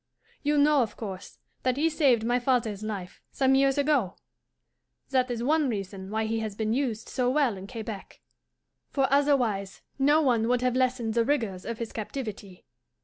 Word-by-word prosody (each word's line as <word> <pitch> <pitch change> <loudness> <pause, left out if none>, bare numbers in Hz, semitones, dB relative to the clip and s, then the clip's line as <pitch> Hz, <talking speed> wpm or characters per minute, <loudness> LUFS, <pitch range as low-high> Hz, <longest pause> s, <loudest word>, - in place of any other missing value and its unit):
You 295 0 +1
know, 290 -1 +5
of 225 - -3
course, 195 -3 -7 0.2
that 255 0 0
he 310 +3 +3
saved 280 -8 +3
my 240 +2 +1
father's 235 -5 0
life, 200 -4 -6
some 265 -1 +2
years 270 0 +3
ago? 280 -10 +1 1.0
That 255 -1 +2
is 235 -1 -3
one 300 +1 +2
reason 195 -3 -5
why 220 +1 -1
he 225 +1 -1
has 215 -2 -4
been 220 +1 -1
used 235 -4 -2
so 250 -1 0
well 265 -5 +2
in 190 +1 -9
Quebec, 220 -3 -7 0.7
for 270 -2 +1
otherwise 245 -9 +1 0.2
no 290 +3 +5
one 240 -7 +2
would 245 0 +2
have 250 -1 +1
lessened 250 -3 0
the 235 0 +3
rigours 225 -9 -1
of 230 -1 -3
his 230 -1 -5
captivity. 210 -5 -6
240 Hz, 175 wpm, -27 LUFS, 215-270 Hz, 1.0 s, know